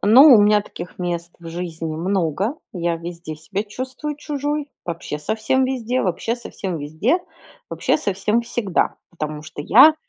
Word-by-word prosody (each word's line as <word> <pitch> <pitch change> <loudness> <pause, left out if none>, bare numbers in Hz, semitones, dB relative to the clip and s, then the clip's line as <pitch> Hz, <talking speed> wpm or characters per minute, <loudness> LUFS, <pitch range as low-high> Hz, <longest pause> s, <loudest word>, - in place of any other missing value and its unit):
Ну, 255 +8 +9
у 215 - +7
меня 210 0 +5
таких 180 -3 -9
мест 175 -1 -3
в 170 -1 -9
жизни 165 -2 -4
много. 185 - 0 0.2
Я 170 -2 0
везде 170 -2 -7
себя 190 +6 -3
чувствую 260 +7 -5
чужой. 295 0 -2
Вообще 170 -3 -4
совсем 220 - +1
везде 255 -1 0
вообще 200 +5 0
совсем 190 -7 -5
везде, 155 - +1 0.5
вообще - - +1
совсем 210 -3 +1
всегда, 230 -5 0 0.2
потому 155 -2 -5
что 155 -1 -8
я 265 - +8
195 Hz, 150 wpm, -22 LUFS, 170-245 Hz, 0.5 s, Ну